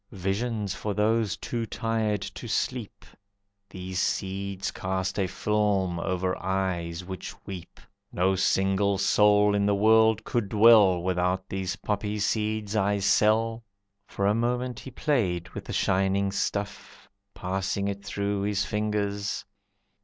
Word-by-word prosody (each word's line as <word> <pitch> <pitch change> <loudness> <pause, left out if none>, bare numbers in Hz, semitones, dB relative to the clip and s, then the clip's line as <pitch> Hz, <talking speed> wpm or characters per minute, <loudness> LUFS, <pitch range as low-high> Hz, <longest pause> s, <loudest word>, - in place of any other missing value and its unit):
"Visions 100 +2 -1
for 105 0 -4
those 110 -1 +1
too 115 -2 -3
tired 110 -2 -1
to 100 +4 -7
sleep. 120 0 -3 0.6
These 95 0 -5
seeds 95 0 -2
cast 95 +1 -2
a 95 - +1
film 100 -3 0
over 90 +1 -1
eyes 90 -3 -2
which 95 0 -7
weep. 95 -3 -9 0.3
No 95 +2 +2
single 95 +1 +2
soul 105 +1 +4
in 100 0 +2
the 100 - +3
world 110 +1 +4
could 115 -4 -1
dwell, 105 -5 +6
Without 90 +1 0
these 95 0 -3
poppy 105 +1 -2
seeds 105 0 -1
I 100 -1 +2
sell." 110 +3 +2 0.4
For 100 - -2
a 100 - +4
moment 120 +1 -1
he - - -9
played 105 - -1
with - - -8
the - - -6
shining 95 +1 +1
stuff, 100 +1 -4 0.3
Passing 95 +2 -2
it 100 0 -4
through 100 0 -2
his 100 0 0
fingers. 105 -1 -2
100 Hz, 130 wpm, -27 LUFS, 95-105 Hz, 0.6 s, dwell